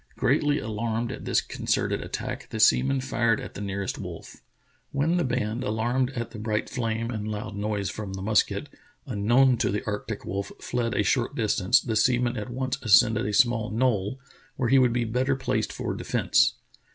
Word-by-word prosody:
Greatly 145 0 +2
alarmed 115 +1 -2
at - - -7
this - - +2
concerted - - -1
attack, - - -5
the 110 - -5
seaman 135 +5 +4
fired 120 -3 +1
at - - -8
the - - -7
nearest 100 -1 -3
wolf. - - -9 0.5
When 155 +5 +1
the 175 - +2
band, 120 -2 -1
alarmed 120 +3 0
at 115 -2 -4
the 110 - -8
bright 110 0 -2
flame 115 -1 -2
and 110 -2 -4
loud 105 -1 -5
noise 100 -1 -2
from 105 -3 -6
the 95 0 -5
musket 105 +3 +1 0.2
— 130 -1 -35
un 105 -6 -4
known 130 +1 +5
to - - +1
the 105 +6 -2
arctic 105 0 -4
wolf 100 +1 -4
— - - -33
fled 120 -1 -2
a 105 - +2
short 120 +3 0
distance 110 +1 +3
the 115 -4 -3
sea 120 +3 +4
man 120 0 0
at 105 +1 -5
once 130 +1 -2
ascended 110 0 +4
a - - -1
small 115 -1 +3
knoll 110 0 0 0.4
where 125 -3 0
he 135 +1 +6
would 125 -2 +4
be 120 0 0
better 130 +4 0
placed 135 - -1
for - - -3
defence. - - +2
115 Hz, 200 wpm, -26 LUFS, 105-125 Hz, 0.5 s, he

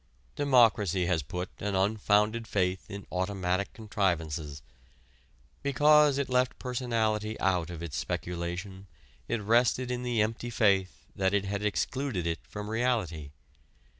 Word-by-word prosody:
Democracy 115 - +3
has 85 -2 +1
put 90 +6 -5
an 100 -1 -2
unfounded 105 +3 +2
faith 95 -2 -1
in 100 -1 -7
automatic 95 0 -1
contrivances. 80 -9 -2 1.0
Because 145 +1 +5
it 140 - 0
left 125 0 +1
personality 110 -4 -1
out 90 -3 +1
of 85 -1 -7
its 80 -4 -5
speculation, 90 +3 -4 0.4
it 115 -3 -2
rested 120 +3 +2
in 125 0 -2
the 120 -2 -1
empty 115 +2 -3
faith 100 -5 +1
that 95 +1 +1
it 100 -1 +1
had 100 +1 -3
excluded 105 -1 -1
it 85 -1 -1
from 105 +13 -8
reality. 110 - -1
100 Hz, 130 wpm, -29 LUFS, 90-120 Hz, 1.0 s, Because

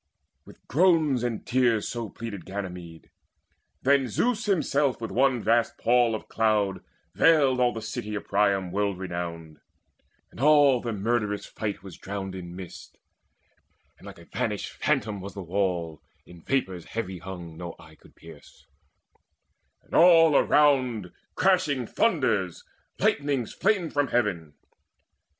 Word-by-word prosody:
With - - -17
groans 155 -4 +3
and 120 -3 -3
tears 120 -4 +1
so 115 -2 -4
pleaded 105 -6 -7
Ganymede. 90 -4 -8 0.7
Then 135 -1 +3
Zeus 230 - 0
himself 145 -7 +1
with 115 - -5
one 130 -2 +2
vast 115 0 +2
pall 120 -1 +3
of 110 - -8
cloud 105 -3 0 0.3
Veiled 140 -6 +4
all 125 -1 +3
the 115 -2 -7
city 105 -1 -5
of 105 - -5
Priam 100 -2 +1
world 100 -1 -1
renowned; 85 -4 -6 0.7
And - - -14
all 145 -3 +5
the 120 - -3
murderous 105 0 -1
fight 105 -3 -5
was 95 -4 -11
drowned 95 -1 -5
in 90 -2 -8
mist, 90 -2 -10 1.0
And - - -13
like - - -10
a 85 - -15
vanished 105 -1 -3
phantom 110 -9 -1
was 100 0 -8
the 100 - -6
wall 90 -4 -2 0.2
In 85 -1 -15
vapours 95 -7 -2
heavy 95 -5 -5
hung 90 -3 -8
no 85 0 -7
eye 80 0 -16
could - - -21
pierce; 75 -3 -16 1.2
And - - -20
all 165 -3 +6
around 130 -12 +3 0.2
crashed 185 -4 +3 0.2
thunders, 130 - 0 0.3
lightnings 140 -5 0
flamed 195 -5 0
From 145 -1 +1
heaven. 95 -12 -1
110 Hz, 135 wpm, -26 LUFS, 95-135 Hz, 1.2 s, all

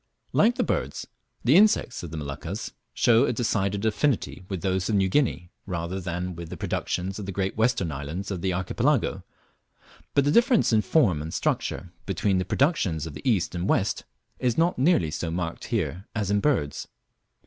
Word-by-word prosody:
Like 235 +3 +4
the - - +1
birds, - - -2 0.4
the - - +5
insects 205 - +4
of 85 - -7
the 80 - -6
Moluccas 75 - -5 0.2
show 120 +1 +4
a - - 0
decided 105 -3 0
affinity 110 -2 0
with 95 -3 -4
those 95 0 0
of 110 - +2
New 95 -1 +3
Guinea 95 -8 0 0.2
rather 90 0 -3
than 90 0 -4
with 85 -1 -7
the - - -7
productions 95 +3 -2
of 100 - -6
the - - -3
great 95 +1 -2
western 110 -7 +1
islands 75 +8 -5
of 90 -3 -3
the 95 - 0
Archipelago, 90 0 0 0.9
but 140 - +5
the 145 - +3
difference 235 - +4
in 110 - +5
form 105 - +2
and 80 +2 -5
structure 90 - -1 0.2
between 95 0 +1
the 90 - -1
productions 95 - +1
of 80 - -7
the 75 - -2
east 95 -5 +1
and 90 +2 -2
west 100 - +1 0.4
is 125 -3 0
not 165 -3 +2
nearly 130 - +3
so 80 +2 -3
marked 85 0 -3
here 95 - -2
as 105 -3 -1
in 100 - +3
birds. 100 - 0
95 Hz, 185 wpm, -26 LUFS, 85-115 Hz, 0.9 s, the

